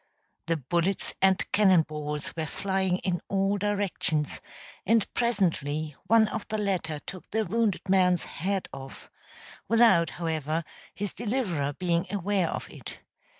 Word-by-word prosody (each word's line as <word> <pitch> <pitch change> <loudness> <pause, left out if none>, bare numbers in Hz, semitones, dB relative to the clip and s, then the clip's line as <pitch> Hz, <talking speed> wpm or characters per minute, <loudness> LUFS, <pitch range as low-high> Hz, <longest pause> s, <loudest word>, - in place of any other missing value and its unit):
The 165 0 +1
bullets 170 +7 0
and 190 -1 +3
cannon 190 -5 +5
balls 150 -1 -5
were 160 -1 -2
flying 190 +1 0
in 180 -3 0
all 195 +1 +1
directions, 195 -7 -1 0.4
and 225 0 +3
presently 155 - 0
one 225 -1 +5
of 220 - -4
the 215 - -2
latter 185 -7 -1
took 180 +5 -9
the 220 +1 0
wounded 210 0 0
man's 180 -2 +3
head 190 +3 -2
off 135 0 -10 0.6
without, 225 -7 +5
however, 160 -1 -1 0.3
his 205 -1 -3
deliverer 200 - -1
being 175 +2 0
aware 200 -3 0
of - - -4
it. - - -9
185 Hz, 135 wpm, -28 LUFS, 160-205 Hz, 0.6 s, cannon